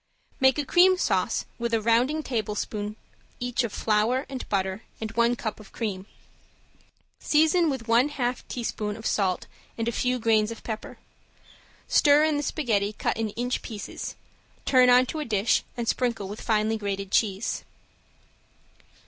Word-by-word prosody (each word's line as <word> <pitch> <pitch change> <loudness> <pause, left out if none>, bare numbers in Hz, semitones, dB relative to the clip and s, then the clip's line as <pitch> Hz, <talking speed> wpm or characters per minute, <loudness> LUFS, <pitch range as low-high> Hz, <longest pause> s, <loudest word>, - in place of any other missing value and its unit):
Make 265 +1 +4
a 295 - -1
cream 365 +5 +5
sauce - - 0
with 235 -1 0
a - - +2
rounding 240 +8 +2
tablespoon 210 -3 -3 0.4
each 245 0 -1
of 235 - -3
flour 225 +6 +1
and 265 -2 -6
butter 190 0 -1 0.2
and 220 -1 -4
one 235 +1 +2
cup 220 -2 -4
of 210 - -14
cream. 200 -4 -4 1.1
Season 320 +2 +3
with 260 -5 -4
one 235 +5 +4
half 250 -3 -2
teaspoon 215 -3 -3
of 220 - -10
salt 190 -3 0 0.3
and 230 0 -2
a - - +1
few 250 +2 0
grains 220 -2 +2
of 230 - -8
pepper. 220 -2 -6 0.9
Stir 290 +1 +5
in 310 -1 +2
the 290 - 0
spaghetti 215 -9 0
cut - - -1
in 225 -1 -2
inch 245 +1 -1
pieces, 215 -3 -6 0.5
turn 255 -2 +5
on 250 +1 +6
to 310 - -5
a - - -1
dish, 215 -4 +2 0.2
and 235 -1 -3
sprinkle 235 -6 0
with 205 +2 -7
finely 220 0 +1
grated 200 -1 -3
cheese. 205 -1 0
230 Hz, 155 wpm, -26 LUFS, 210-255 Hz, 1.1 s, on